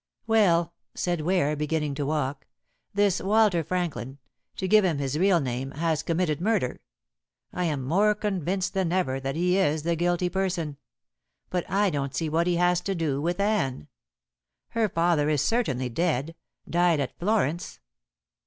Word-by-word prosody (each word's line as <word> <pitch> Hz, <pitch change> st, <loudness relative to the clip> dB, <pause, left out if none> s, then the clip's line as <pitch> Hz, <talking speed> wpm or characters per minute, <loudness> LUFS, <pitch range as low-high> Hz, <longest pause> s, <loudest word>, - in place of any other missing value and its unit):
"Well," 180 Hz, -7 st, +3 dB, 0.2 s
said 175 Hz, -3 st, -1 dB
Ware, 155 Hz, -3 st, +1 dB
beginning 150 Hz, 0 st, -1 dB
to 140 Hz, 0 st, -3 dB
walk, 145 Hz, -2 st, -2 dB, 0.4 s
"this 200 Hz, -2 st, +2 dB
Walter 205 Hz, -3 st, +3 dB
Franklin 160 Hz, -6 st, -3 dB, 0.4 s
to 190 Hz, -, -3 dB
give 215 Hz, +2 st, +5 dB
him 170 Hz, -6 st, +1 dB
his 140 Hz, +1 st, -2 dB
real 185 Hz, -1 st, +4 dB
name 130 Hz, -1 st, -3 dB
has 160 Hz, 0 st, 0 dB
committed 165 Hz, -2 st, -1 dB
murder. 205 Hz, -, 0 dB, 0.7 s
I 180 Hz, -, -1 dB
am 145 Hz, -5 st, -1 dB
more 200 Hz, +10 st, +3 dB
convinced 195 Hz, -3 st, -2 dB
than 190 Hz, -4 st, 0 dB
ever 155 Hz, -8 st, 0 dB
that 135 Hz, +1 st, -3 dB
he 180 Hz, +3 st, +2 dB
is 155 Hz, -4 st, +1 dB
the 170 Hz, +1 st, +1 dB
guilty 175 Hz, +1 st, +1 dB
person. 175 Hz, -5 st, -2 dB, 0.7 s
But 180 Hz, -1 st, -2 dB
I 200 Hz, +1 st, +2 dB
don't 140 Hz, -2 st, -3 dB
see 160 Hz, -2 st, -1 dB
what 165 Hz, +3 st, +1 dB
he 175 Hz, -, +2 dB
has 175 Hz, 0 st, +2 dB
to 195 Hz, +1 st, -2 dB
do 150 Hz, -5 st, -1 dB
with 175 Hz, +4 st, -1 dB
Anne. 195 Hz, -, 0 dB, 0.8 s
Her 225 Hz, -2 st, 0 dB
father 165 Hz, -3 st, +2 dB
is 150 Hz, -2 st, +2 dB
certainly 140 Hz, -, 0 dB
dead 155 Hz, +3 st, -1 dB, 0.3 s
died 175 Hz, -2 st, +2 dB
at 140 Hz, -, -3 dB
Florence. 175 Hz, -5 st, -1 dB
170 Hz, 160 wpm, -26 LUFS, 150-185 Hz, 0.8 s, give